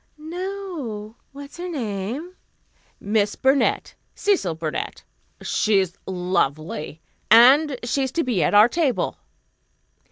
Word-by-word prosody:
"No. 320 - -6 0.2
What's 280 +2 -11
her 360 +1 -5
name?" 250 - -4 0.6
"Miss 205 0 0
Burnett 270 +1 +1 0.2
Cecil 355 - 0
Burnett. 160 -1 -5 0.4
She's 195 -4 +1
lovely. 160 -4 -2 0.3
And 260 +6 +6
she's 265 +2 -1
to 335 - 0
be 235 -8 0
at 155 - +2
our 210 +2 +8
table." 280 -1 -1
240 Hz, 100 wpm, -23 LUFS, 195-305 Hz, 0.6 s, our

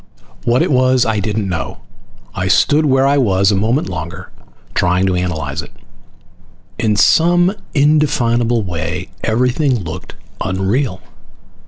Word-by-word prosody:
What 120 +1 +3
it - - -1
was, 130 -1 +3
I 110 -2 0
didn't 105 0 -2
know. 85 -3 -4 0.5
I 90 - -2
stood 150 +10 +3
where 135 0 +3
I 140 +1 +3
was 100 -5 +2
a - - +1
moment 115 +9 0
longer, 90 +1 -7 0.4
trying 90 +2 +1
to 95 - +1
analyze 90 -3 -2
it. - - -13 1.1
In 110 -3 +1
some 175 - +4 0.2
indefinable 120 -6 +2
way 85 0 -4
everything 125 +4 +1
looked 85 +2 -8 0.3
unreal. 95 +2 -1
110 Hz, 130 wpm, -16 LUFS, 95-130 Hz, 1.1 s, some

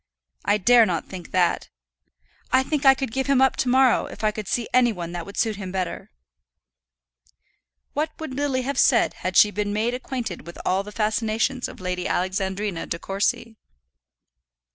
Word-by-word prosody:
I 205 +1 +2
dare 235 +2 +5
not 170 -3 -2
think 180 -3 -9
that. 180 -2 +1 0.8
I 260 0 +4
think 280 0 0
I 270 - +8
could 265 -3 -4
give 265 +3 -2
him 275 -2 +3
up 265 0 +4
to 255 - 0
morrow, 260 -1 +4
if - - -10
I 215 - +3
could 210 -1 -7
see 235 +2 -1
any 245 -1 +5
one 175 -4 -6
that 175 0 -6
would 200 - -10
suit 220 -3 0
him 190 -3 -6
better." 185 -1 -4 1.8
What 305 +2 0
would 315 -4 -6
Lily 270 -2 -1
have 275 0 -2
said 240 -4 +4
had 185 0 -1
she 210 - +7
been 205 0 -2
made 225 +3 0
acquainted 250 -8 -5
with 170 - -9
all 190 +1 +2
the 205 +1 -9
fascinations 220 +4 0
of - - -11
Lady 180 -1 -3
Alexandrina 190 0 -2
De 170 - -3
Courcy? 200 +5 -2
215 Hz, 180 wpm, -24 LUFS, 190-255 Hz, 1.8 s, I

